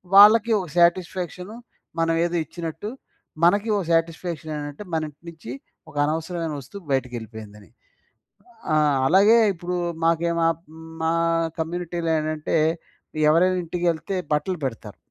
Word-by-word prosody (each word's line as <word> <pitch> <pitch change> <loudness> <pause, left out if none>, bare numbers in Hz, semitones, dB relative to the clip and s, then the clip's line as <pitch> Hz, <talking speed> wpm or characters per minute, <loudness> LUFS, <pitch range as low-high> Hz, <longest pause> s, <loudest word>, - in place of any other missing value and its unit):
వాళ్ళకి 215 +3 +8
ఒక 180 - -5
సాటిస్ఫాక్షన్ 180 +2 +1 0.5
మనం 165 0 +2
ఏదో 175 0 -2
ఇచ్చినట్టు. 165 +5 -6 0.5
మనకి 200 +5 +4
ఓ - - +1
సాటిస్ఫాక్షన్ 165 -1 -1
ఏంటంటే, 145 +5 -6
మన 160 - +1
ఇంటి 145 - -23
నుంచి 160 -7 -10 0.4
ఒక - - -16
అనవసరమైన 160 +1 -2
వస్తువు 175 +9 -11
బయటికెళ్ళిపోయిందని. 110 -5 -4 1.0
ఆ! - - +4 0.3
అలాగే 205 +7 +6 0.2
ఇప్పుడు 175 +1 -4 0.3
మాకే 165 +1 +2
మా 165 - +4 0.5
మా 160 0 +1 0.5
కమ్యూనిటీలో 170 0 -3
ఏంటంటే 155 0 -2 0.7
ఎవరైనా 180 +3 +4
ఇంటికేళ్తే 175 +2 -2 0.2
బట్టలు 180 +4 0
పెడతారు. 115 -5 -6
165 Hz, 115 wpm, -23 LUFS, 155-180 Hz, 1.0 s, వాళ్ళకి